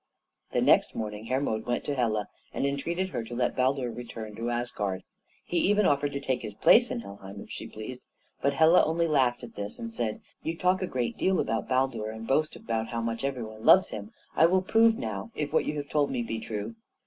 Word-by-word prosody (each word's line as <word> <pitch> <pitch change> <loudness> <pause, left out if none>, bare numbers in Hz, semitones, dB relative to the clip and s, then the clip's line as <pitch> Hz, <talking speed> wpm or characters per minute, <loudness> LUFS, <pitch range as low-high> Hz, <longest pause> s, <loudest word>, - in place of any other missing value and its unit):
The - - +1
next - - +4
morning 105 0 -4
Hermod 125 -3 -1
went 120 - 0
to 145 - -2
Hela, 110 -5 0 0.3
and - - 0
entreated 170 +7 -1
her 120 - -3
to 115 +2 -7
let 120 0 0
Baldur 130 -1 +1
return 115 -2 -7
to 115 +2 -3
Asgard. 110 -6 -2 0.4
He 175 - -2
even 205 +3 +3
offered 145 -1 +2
to 140 - -2
take 130 -2 -1
his 105 -3 -6
place 240 - +6
in 115 - -3
Helheim 100 -1 -10
if - - -10
she - - -6
pleased; 115 +4 -8 0.4
but 140 0 +1
Hela 160 +3 +6
only 165 +2 +1
laughed 130 -5 +2
at 120 - -9
this 100 0 -5
and 230 -1 -6
said: 110 - -2 0.2
"You 165 +1 -3
talk 185 +2 +2
a 185 - -1
great 125 -6 -2
deal 190 0 +2
about 115 0 -1
Baldur, 130 -4 +1
and 110 +1 -7
boast 155 +5 +1
how 115 0 -1
much 115 +2 -3
every 135 -3 -2
one 110 0 -9
loves 190 - +7
him; 105 0 -7 0.2
I 165 - +6
will 185 +2 +2
prove 225 +3 +4
now 255 - -4
if 150 -1 -3
what - - +3
you 150 - -2
have 145 -1 -4
told 145 -2 +2
me 125 -3 -1
be 115 -1 -3
true. 110 0 -5
125 Hz, 220 wpm, -28 LUFS, 110-155 Hz, 0.4 s, loves